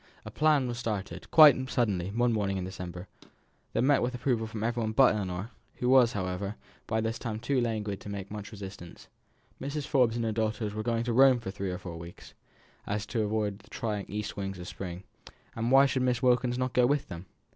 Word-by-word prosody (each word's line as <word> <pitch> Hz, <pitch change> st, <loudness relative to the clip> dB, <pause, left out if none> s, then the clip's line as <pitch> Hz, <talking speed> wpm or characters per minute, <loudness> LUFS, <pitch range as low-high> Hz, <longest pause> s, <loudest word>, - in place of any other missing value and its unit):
A -, -, -7 dB
plan 150 Hz, -4 st, +3 dB
was 120 Hz, -1 st, -4 dB
started, 105 Hz, -5 st, -4 dB
quite 145 Hz, -5 st, +7 dB
suddenly, 100 Hz, -9 st, 0 dB
one 120 Hz, +3 st, +1 dB
morning 100 Hz, -3 st, 0 dB
in 95 Hz, -, -3 dB
December, 90 Hz, 0 st, -7 dB, 0.7 s
that -, -, +1 dB
met 140 Hz, +1 st, +4 dB
with 125 Hz, +1 st, -1 dB
approval 120 Hz, -3 st, 0 dB
from 110 Hz, -1 st, -5 dB
everyone 115 Hz, -1 st, -1 dB
but 130 Hz, +1 st, +6 dB
Ellinor, 95 Hz, +1 st, -4 dB, 0.2 s
who 125 Hz, -, -1 dB
was, 125 Hz, -2 st, +6 dB
however, 95 Hz, +1 st, -3 dB, 0.3 s
by 110 Hz, 0 st, 0 dB
this 115 Hz, +1 st, -2 dB
time 110 Hz, -3 st, -4 dB
too 125 Hz, +3 st, 0 dB
languid 105 Hz, -4 st, -2 dB
to -, -, -8 dB
make 100 Hz, -1 st, -6 dB
much 105 Hz, 0 st, -7 dB
resistance. 95 Hz, -4 st, -10 dB, 0.5 s
Mrs. 140 Hz, +1 st, -3 dB
Forbes 125 Hz, -5 st, +2 dB
and 115 Hz, -1 st, -1 dB
her 110 Hz, -, 0 dB
daughters 110 Hz, -1 st, -1 dB
were 110 Hz, -, -3 dB
going 115 Hz, +1 st, 0 dB
to 120 Hz, -1 st, -1 dB
Rome 130 Hz, 0 st, +6 dB
for 95 Hz, -5 st, -5 dB
three 95 Hz, 0 st, -4 dB
or 90 Hz, -, -3 dB
four 85 Hz, -2 st, -8 dB
months, 85 Hz, +1 st, -11 dB
so -, -, -22 dB, 0.5 s
as 100 Hz, 0 st, -2 dB
to 110 Hz, +2 st, -2 dB
avoid 105 Hz, -1 st, -1 dB
the -, -, -20 dB
trying 105 Hz, -3 st, -3 dB
east 105 Hz, +2 st, -4 dB
winds 95 Hz, -1 st, -4 dB
of 90 Hz, 0 st, -8 dB
spring; 90 Hz, -1 st, -6 dB, 0.5 s
why 130 Hz, +5 st, +4 dB
should 135 Hz, -1 st, 0 dB
not -, -, +1 dB
Miss 125 Hz, -1 st, 0 dB
Wilkins 125 Hz, 0 st, +3 dB, 0.2 s
go 125 Hz, -1 st, +4 dB
with 145 Hz, +1 st, 0 dB
them? 90 Hz, 0 st, -8 dB
110 Hz, 210 wpm, -29 LUFS, 100-125 Hz, 0.7 s, quite